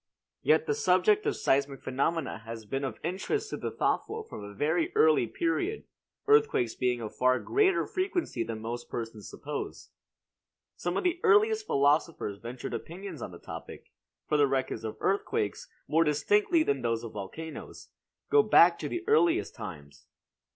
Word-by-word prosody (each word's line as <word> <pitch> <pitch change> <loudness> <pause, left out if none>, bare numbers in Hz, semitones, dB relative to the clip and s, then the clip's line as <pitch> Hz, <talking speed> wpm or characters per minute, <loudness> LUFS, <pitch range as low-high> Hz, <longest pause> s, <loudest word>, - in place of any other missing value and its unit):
Yet - - +3
the 445 - +1
subject 430 -1 +3
of 430 - +1
seismic 140 0 0
phenomena 135 0 -1
has 115 0 -8
been 135 +6 -3
of 130 -5 -3
interest 200 - -2
to - - -3
the - - -3
thoughtful 445 +1 -1
from 105 - -9
a 100 - -8
very 160 - +1
early 155 -6 +4
period, 170 - -1 0.4
earthquakes 430 - +3
being 125 -2 0
of 110 - -6
far 130 0 +3
greater 390 -2 +2
frequency 370 -2 -2
than 110 -1 -6
most 120 +2 -5
persons 115 -3 -6
suppose. - - -6 0.8
Some 175 +2 -2
of - - -1
the 355 -1 +1
earliest 430 0 +4
philosophers 140 -7 +1
ventured 120 +2 -6
opinions 175 -3 -7
on - - -5
the 85 - -10
topic; - - -10 0.3
for 150 - +1
the 145 -1 +5
records 130 -3 -2
of 110 - -5
earthquakes, 430 - -1 0.2
more 165 +2 +3
distinctly 205 - +2
than 140 - 0
those 115 -1 -1
of 115 - -6
volcanoes, 130 +11 -8 0.4
go 435 - +7
back - - +6
to - - -4
the 350 - -3
earliest 355 -6 +3
times. 70 -3 -10
155 Hz, 160 wpm, -29 LUFS, -, 0.8 s, go